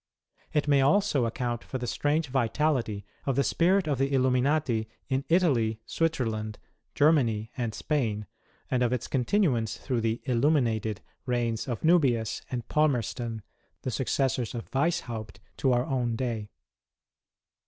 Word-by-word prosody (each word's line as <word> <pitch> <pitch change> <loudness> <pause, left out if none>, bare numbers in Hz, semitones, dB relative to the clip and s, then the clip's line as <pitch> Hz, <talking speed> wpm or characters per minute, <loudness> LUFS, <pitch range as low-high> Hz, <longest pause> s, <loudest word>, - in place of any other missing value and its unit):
It 150 -1 +1
may 140 -1 +5
also 145 - +3
account 120 0 -3
for 130 - -5
the 125 - -4
strange 150 +6 0
vitality 125 -4 0 0.2
of 135 - +1
the 140 - +3
spu 180 +7 +3
it 190 -5 -1
of 140 -4 0
the 135 +1 +1
Illuminati 130 -3 +2 0.2
in 135 0 0
Italy, 130 -11 +2
Switzerland, 110 -10 -1 0.4
Germany, 120 -8 +3
and 120 -4 -2
Spain, 110 -9 -1 0.5
and 125 -1 +2
of 120 -1 +2
its 125 -1 -2
continuance 130 - +1
through 125 -4 -2
the 115 +1 0
" - - -34
Illuminated 115 -5 +1
" - - -48
reigns 120 -2 -1
of 120 -3 -4
Nubius 130 -10 +3
and 120 -2 -4
Palmerston, 120 -6 0 0.4
the 130 - -2
successors 130 -2 0
of 115 - -7
Weishaupt 120 - -1 0.2
to 135 - +2
our 120 0 +2
own 125 -4 -1
day. 115 -4 -3
125 Hz, 145 wpm, -28 LUFS, 115-145 Hz, 0.5 s, may